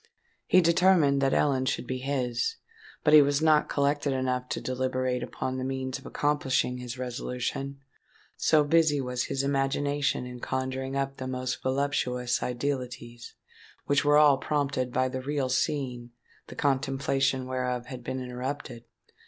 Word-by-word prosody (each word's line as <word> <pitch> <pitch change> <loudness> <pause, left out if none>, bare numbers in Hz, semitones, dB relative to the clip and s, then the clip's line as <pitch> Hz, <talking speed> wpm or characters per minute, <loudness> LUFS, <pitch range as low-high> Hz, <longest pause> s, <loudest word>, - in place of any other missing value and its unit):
He 185 - +6
determined 170 -5 +4
that 135 -1 +2
Ellen 130 -3 +2
should - - -1
be 130 +1 -3
his; 135 - -1 0.5
but 150 - +4
he 155 - +10
was 140 0 +2
not 155 -1 +3
collected 145 0 +1
enough 125 -1 -1
to - - -2
deliberate 130 -1 -1
upon 130 +1 -4
the - - -3
means 130 0 -3
of - - -12
accomplishing 135 -3 0
his 125 0 -6
resolution,—so 135 +4 -2
busy 155 -1 +3
was 125 -1 -2
his 135 - -2
imagination 140 -1 0
in 125 0 -8
conjuring 130 +1 -3
up 135 0 -2
the 130 - -5
most 130 -1 -3
voluptuous 130 -2 0
idealities, 125 -2 -4 0.5
which 145 0 +2
were 145 0 +5
all 145 -3 +6
prompted 140 -3 -1
by 130 +1 +1
the 130 0 -4
real 140 -1 -1
scene 125 -2 -1 0.4
the - - -10
contemplation 135 -1 0
whereof 125 -1 -2
had 130 -4 -8
been 130 - -3
interrupted. 125 0 -5
130 Hz, 145 wpm, -28 LUFS, 125-145 Hz, 0.5 s, he